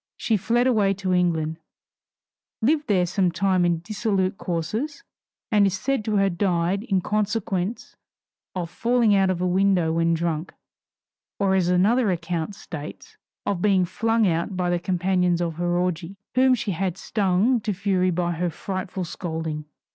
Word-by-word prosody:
She 225 - +1
fled 235 +5 +1
away 210 -6 +3
to 185 -1 -1
England, 165 -3 +1 1.0
lived 295 +6 +1
there 185 -4 +3
some 180 0 +1
time 185 +1 +1
in 170 -2 +1
dissolute 195 -1 -1
courses, 215 - -3 0.5
and 205 -2 +5
is 190 - -1
said 270 +1 -1
to 215 - 0
have 195 -3 +1
died 185 0 +1
in 195 -5 0
consequence 210 0 -2 0.6
of 175 -2 -3
falling 235 +1 +2
out 195 -1 +3
of 180 -1 -1
a - - +2
window 180 -3 +2
when 165 0 +2
drunk, 165 0 -2 0.8
or 195 -1 +2
as 185 -2 +2
another 205 +6 +3
account 170 +1 -2
states, 150 -5 -9 0.3
of 200 -4 -1
being 195 -3 +3
flung 225 +5 +1
out 175 +2 0
by 180 -1 0
the 175 - +1
companions 180 -1 +1
of 165 -2 -2
her 175 0 0
orgy, 180 +1 -2 0.2
whom 255 0 +4
she 215 -3 -3
had 185 0 -2
stung 205 +5 +1
to 215 -1 -1
fury 185 -1 +1
by 175 0 0
her 175 +1 -1
frightful 185 +2 -4
scolding. 160 -3 -4
185 Hz, 160 wpm, -24 LUFS, 175-205 Hz, 1.0 s, and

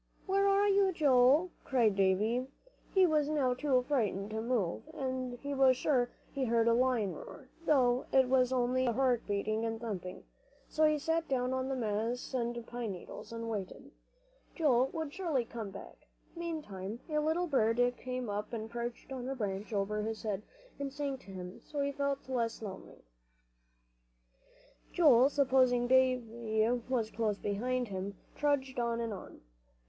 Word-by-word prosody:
"Where 395 +1 +2
are 400 +1 +4
you, 395 -1 +4
Joel?" 290 +2 +4
cried 230 -6 +2
Davie. 210 +6 +2 0.4
He 380 -1 +5
was 305 -3 +2
now 280 -5 +2
too 255 -1 +1
frightened 215 -7 0
to 220 0 -2
move, 220 - -1
and 255 -2 -3
he 285 +3 -5
was 265 -2 +5
sure 250 -4 +2 0.2
he 270 -1 -1
heard 230 -1 +2
a 230 - +5
lion 240 -5 +2
roar, - - -11 0.2
though 255 -4 +3
it 265 -1 +5
was 255 -1 +3
only 255 0 +1
his 235 - +1
heart 255 -2 +2
beating 215 +2 -1
and 225 0 -2
thumping; 190 -6 -5 0.4
so 310 - +2
he 305 0 +3
sat 325 +3 -1
down 255 -1 0
on 260 0 -1
the 270 - -1
moss 230 +2 -2
and 235 -2 -2
pine 235 -4 -4
needles, 180 - -9
and 230 0 -5
waited. 205 -5 -5 0.6
Joel 265 -6 +3
would 315 0 -5
surely 315 -10 -1
come 225 -3 -6
back. 195 0 -12 0.3
Meantime 235 - -5
a 305 -2 0
little 320 +4 +1
bird 230 -7 +2 0.2
came 255 -1 -4
up 210 +2 -4
and 220 -1 -4
perched 240 +2 -5
on 255 -1 -4
the 270 - -2
branch 205 -2 -3
above 210 +1 -1
his 220 +1 -4
head, 205 -3 -2 0.4
and 280 -1 -3
sang 280 -1 -3
to 195 - -13
him, 180 -1 -8
so 295 - -6
he 280 0 0
felt 280 -1 -2
less 235 -3 -2
lonely. 195 -2 -9 1.9
Joel, 275 -6 +6
supposing 255 -3 +3
Davie 235 -4 +2 0.2
was 230 -4 0
close 215 -3 -1
behind 245 +5 -1
him, 195 +1 -4 0.2
trudged 270 -3 0
on 235 -1 0
and 230 -2 -2
on. 190 - -10
250 Hz, 165 wpm, -32 LUFS, 220-275 Hz, 1.9 s, Joel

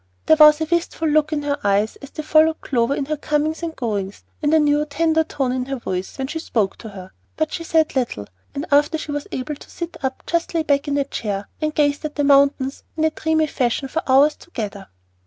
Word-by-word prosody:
There 315 - +6
was 300 0 +8
a 315 - 0
wistful 335 0 -1
look 305 0 +2
in 295 -1 -1
her 285 0 -1
eyes 205 +2 +1
as 280 - -11
they 310 - -6
followed 315 +1 +4
Clover 245 +1 0
in 280 - -2
her 305 +2 -2
comings 300 +2 -1
and 330 -1 -4
goings, 205 -5 -3 0.2
and 295 -1 +1
a 320 - +5
new, 295 -1 +3
tender 320 +2 +1
tone 270 -5 -2
in 255 0 -2
her 275 +1 -3
voice 185 -7 -4
when 265 - -2
she 320 +4 -4
spoke 220 -10 -1
to 220 - -8
her; 190 -2 -10 0.3
but 315 -1 -1
she 335 - -4
said 320 -2 +1
little, 240 - -1 0.3
and 280 +3 -3
after 295 +3 +4
she 305 - -6
was 290 0 -4
able 260 +4 -3
to - - -15
sit 340 -1 -6
up 265 0 -3
just 335 0 -1
lay 325 - +2
back 285 -2 +1
in 285 - 0
her 280 - +2
chair 205 -7 -4
and 305 0 -1
gazed 290 -1 +1
at 305 -1 -4
the 290 - 0
mountains 275 -1 +3
in 315 - 0
a 315 - +3
dreamy 315 0 +1
fashion 265 -2 -1
for 320 +5 -2
hours 275 +3 +5
together. 205 - -7
290 Hz, 235 wpm, -21 LUFS, 260-315 Hz, 0.3 s, was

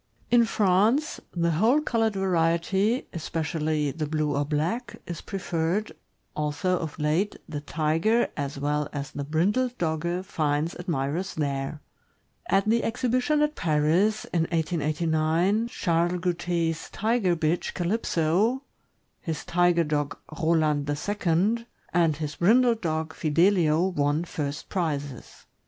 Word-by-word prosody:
In 240 -1 +6
France, 220 +7 +2
the 170 -1 0
whole 220 - +3
colored 225 -7 0
variety, 190 +5 +1
especially 155 -2 -1
the 155 +1 -3
blue 150 -1 0
or 145 - +1
black, 160 - -2
is 170 -2 -6
preferred, 185 +1 -2 0.4
although 150 +5 0
of 160 -3 -5
late 155 +7 0
the 145 -2 -5
Tiger 165 +10 +1
as 140 -1 -4
well 145 +1 -1
as 145 -1 -4
the 145 - -4
brindled 205 - 0
Dogge 170 +2 -1
finds 155 -2 -1
admirers 170 +2 -2
there. 140 0 -2 0.7
At 195 +2 +2
the 230 +2 +3
exhibition 255 +5 +1
at 300 0 +1
Paris, 170 - +1
in 165 -2 +2
1889, 160 +5 +1
Charles 170 -6 0
Goute's 170 -2 -1
Tiger 215 -4 +1
bitch 160 +1 -1
Calypso, 190 - +1 0.6
his 160 -4 -5
Tiger 175 -1 +3
dog 145 -2 -2 0.2
Roland 155 -3 +1
II., 205 +7 0 0.3
and 165 -4 +3
his 150 -1 -5
brindled 230 +5 +4
dog 160 -1 -2
Fidelio 165 +1 +3
won 145 -2 0
lirst 150 -3 -4
prizes. 145 -7 -4
170 Hz, 120 wpm, -26 LUFS, 155-200 Hz, 0.7 s, In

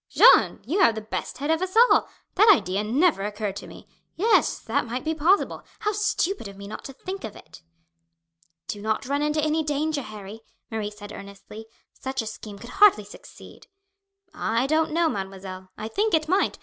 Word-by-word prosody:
"Jeanne, - - +6
you 365 +7 -1
have 275 - +5
the 220 - -4
best 215 - -5
head 290 +4 -1
of 320 +1 +1
us 375 +3 -2
all. 480 +2 +5 0.2
That 425 +4 +5
idea 200 - +1
never 265 - +2
occurred 205 0 -3
to - - -8
me. - - -13 0.3
Yes, 435 +6 +3
that - - -2
might 250 +2 -4
be 320 - -1
possible. 330 +6 +2 0.2
How 420 -1 -1
stupid 410 - -1
of 200 0 -11
me 200 0 -9
not 215 - -8
to 270 - -7
think 375 +8 -7
of 215 - -7
it!" 160 +1 -14 1.1
"Do 205 - -5
not 220 +4 -1
run 280 +2 -1
into 300 0 0
any 310 +1 +1
danger, 295 0 -1
Harry," 215 -1 -9 0.3
Marie 220 -2 -2
said 210 0 -11
earnestly. 200 +2 -11 0.3
"Such 265 -2 -4
a - - -9
scheme 215 -1 -8
could 235 +4 -11
hardly 405 - +5
succeed." 205 - -14 0.7
"I 230 +3 0
don't 315 +3 +2
know, 335 +1 +2
mademoiselle. 190 -5 -6
I 215 - -5
think 410 - +1
it 310 -1 0
might. 380 +4 +1
260 Hz, 190 wpm, -25 LUFS, 210-320 Hz, 1.1 s, Jeanne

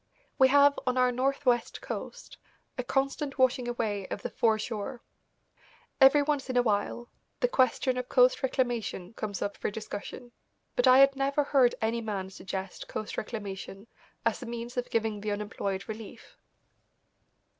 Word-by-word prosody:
We 265 - +8
have, 285 +1 +5
on 255 0 +1
our 250 0 +4
northwest 255 -1 0
coast, - - -7 0.4
a 250 - -3
constant 275 +2 -1
washing 255 -1 +2
away 215 -5 -2
of - - -6
the - - -4
fore 220 -2 +2
shore. 225 +3 -5 1.0
Every 270 +2 +7
once 285 -2 -1
in 255 - 0
a 245 - +5
while 220 +2 -1 0.3
the - - +3
question 255 - +2
of 250 0 -4
coast 250 0 +4
reclamation 240 -7 -2
comes 210 -3 -4
up 205 - -3
for - - -2
discussion, 220 +3 -7 0.4
but 245 - +3
I 255 0 +8
had 275 0 +6
never 275 +2 +1
heard 265 -4 +3
any 230 +1 0
man 195 -4 -4
suggest 190 0 -6
coast 215 - -5
reclamation 200 -2 -6 0.4
as - - +1
a 245 - -7
means 235 +1 -6
of 245 -1 -2
giving 220 -2 -1
the 210 - -3
unemployed 205 -2 -3
relief. 220 -1 -9
240 Hz, 155 wpm, -29 LUFS, 215-260 Hz, 1.0 s, We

